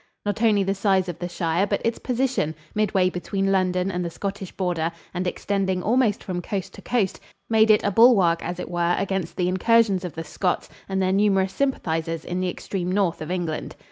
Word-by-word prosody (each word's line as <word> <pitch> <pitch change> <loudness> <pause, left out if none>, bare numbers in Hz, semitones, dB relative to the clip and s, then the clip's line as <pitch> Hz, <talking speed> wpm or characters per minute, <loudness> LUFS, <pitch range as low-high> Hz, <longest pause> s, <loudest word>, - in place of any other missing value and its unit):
Not 205 +1 -2
only 210 -4 +4
the 195 +1 0
size 195 -2 +2
of 170 -1 -6
the 175 - -4
shire, 170 +2 0
but - - -1
its 230 0 0
position 250 - -1 0.2
midway 200 -3 +2
between 195 +2 -1
London 185 0 +1
and 180 -1 -2
the 170 - -2
Scottish 195 +2 -5
border, 175 -3 -1 0.2
and 180 0 -2
extending 190 -1 -1
almost 230 -2 +2
from 180 -2 -3
coast 190 +1 -4
to - - -11
coast 225 -6 0 0.3
made 220 0 +5
it 215 - +5
a 205 - +1
bulwark, 195 -7 +5
as 175 +1 -4
it - - -6
were, 175 0 +1
against 190 -2 -2
the 180 - +1
incursions 195 +1 +3
of 180 -4 -5
the 165 - -4
Scots 180 +3 -2 0.2
and 190 0 0
their 185 - +2
numerous 195 -1 +2
sympathizers 165 - -1
in 180 +1 -3
the 185 0 0
extreme 180 0 -4
north 185 -4 +1
of 155 - -5
England. 175 -4 -3
190 Hz, 205 wpm, -24 LUFS, 175-205 Hz, 0.3 s, made